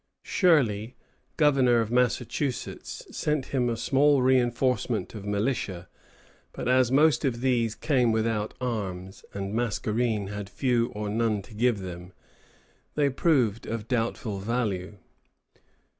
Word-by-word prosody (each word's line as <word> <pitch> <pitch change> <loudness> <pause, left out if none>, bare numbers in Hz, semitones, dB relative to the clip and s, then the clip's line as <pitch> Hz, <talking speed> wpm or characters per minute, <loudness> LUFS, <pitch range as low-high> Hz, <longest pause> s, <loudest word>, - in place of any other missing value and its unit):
Shirley, 125 - +2 0.4
governor 135 -6 +4
of 115 -1 -1
Massachusetts, 125 +2 -1
sent 150 -3 0
him 125 -3 +2
a 115 - -2
small 140 +2 +3
reinforcement 125 -2 +1
of 105 -2 -8
militia; 100 -4 -2 0.7
but - - -5
as 125 -1 +3
most 150 +3 +4
of 120 -4 -1
these 120 -4 +1
came 125 -6 +2
without 110 -1 -1
arms, 95 -7 -4
and 100 -1 -3
as - - -6
Mascarene 110 -2 -1
had 105 -1 -6
few 120 -2 +1
or 105 0 -3
none 110 -1 0
to 110 - -15
give 115 -1 +1
them, 90 0 -8 0.8
they 145 -2 +2
proved 125 - +1
of 115 -1 -4
doubtful 115 -4 -2
value. 105 -3 -2
115 Hz, 130 wpm, -27 LUFS, 105-130 Hz, 0.8 s, governor